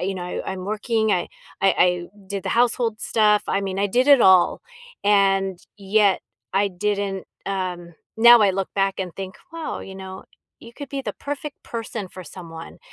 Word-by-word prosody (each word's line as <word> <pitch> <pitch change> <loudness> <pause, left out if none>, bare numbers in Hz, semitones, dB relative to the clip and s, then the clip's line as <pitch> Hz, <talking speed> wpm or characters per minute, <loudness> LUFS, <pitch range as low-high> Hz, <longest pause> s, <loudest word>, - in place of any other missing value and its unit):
you 190 +2 -1
know, 180 - -5
I 180 - -4
I'm 185 -1 -6
working. 220 +1 0
I 175 - 0 0.3
I 195 - +5
I 180 -1 +3 0.2
did 200 0 -4
the - - -4
household 235 -2 +1
stuff. 210 -2 +3
I 195 - 0
mean, 195 -1 -3
I 200 - +2
did 250 +7 +1
it 280 -3 +8
all, 185 -3 +5 0.4
and 195 -2 +3 0.2
yet 200 0 +2 0.3
I 195 +2 +2
didn't, 200 0 -2 0.2
um 180 -3 -4 0.2
now 235 +1 +8
I 205 -2 +5
look 190 0 -2
back 195 -1 0
and 180 -3 -5
think, 190 0 -7 0.2
"Wow," 330 -1 -5
you 190 - -9
know, 190 0 -9 0.4
"you 230 - -13
could 285 -2 -8
be 275 - -3
the - - -4
perfect 290 0 -6
person 225 -3 -5
for 185 - -10
someone, 165 -3 -10
195 Hz, 185 wpm, -23 LUFS, 190-220 Hz, 0.4 s, it